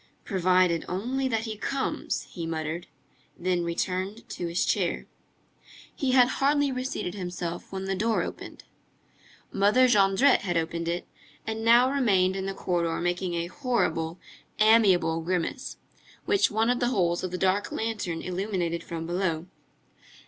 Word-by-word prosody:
"Provided 185 -3 +2
only 250 +9 -1
that 225 -4 0
he 220 -2 -4
comes!" 270 +5 -2
he 170 -2 -7
muttered, 160 +1 -3 0.5
then 180 0 0
he - - -1
returned 185 +6 -3
to 175 -5 -4
his 170 +1 0
chair. - - 0 0.9
He 265 -2 0
had 250 -2 +6
hardly 280 +2 +2
reseated 255 -8 -3
himself 175 -3 -5
when 190 0 -4
the 195 - -1
door 220 +4 +1
opened. - - -8 0.9
Mother 210 +6 +4
Jondrette 210 +4 +4
had 175 -3 -1
opened 165 +1 -2
it, 170 +1 -2 0.4
and 220 0 -3
now 240 +3 +6
remained 195 -9 +2
in 190 0 -3
the 195 - -4
corridor 170 -3 -1
making 175 0 -1
a 170 0 -1
horrible, 175 - -1 0.4
amiable 195 -7 +4
grimace, 175 0 -3 0.5
which 400 - +3
one 220 +3 +2
of 245 - 0
the 245 - +1
holes 180 -8 +1
of 185 - -2
the 180 - -4
dark 190 +2 +1
lantern 205 -7 -3
illuminated 180 -2 -2
from 165 -1 -5
below. 170 -2 -1
190 Hz, 150 wpm, -27 LUFS, 175-225 Hz, 0.9 s, had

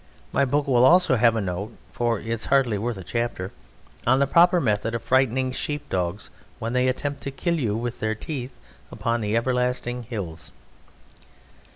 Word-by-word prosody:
My 140 - +2
book 145 +2 +1
will 125 -2 +4
also 175 0 +6
have 115 -1 +4
a 110 - 0
note 100 +4 -4 0.2
(for 120 -3 0
it - - -12
is 115 0 -2
hardly 125 -7 +2
worth 115 0 -2
a 95 - -7
chapter) 115 -2 -3 0.6
on 130 +2 +5
the 140 - +3
proper 175 +5 +5
method 115 -3 0
of 115 - -4
frightening 130 0 +2
sheep 145 +3 -4
dogs 90 +2 -2 0.3
when 115 +1 -4
they 125 0 +2
attempt 140 +2 -2
to - - -3
kill 170 +5 -1
you 110 -6 0
with 120 +1 -4
their 110 0 -1
teeth 130 +1 -5 0.4
upon 115 0 -1
the 105 +1 -1
everlasting 125 0 0
hills. 100 -9 -6
120 Hz, 180 wpm, -24 LUFS, 110-130 Hz, 0.6 s, also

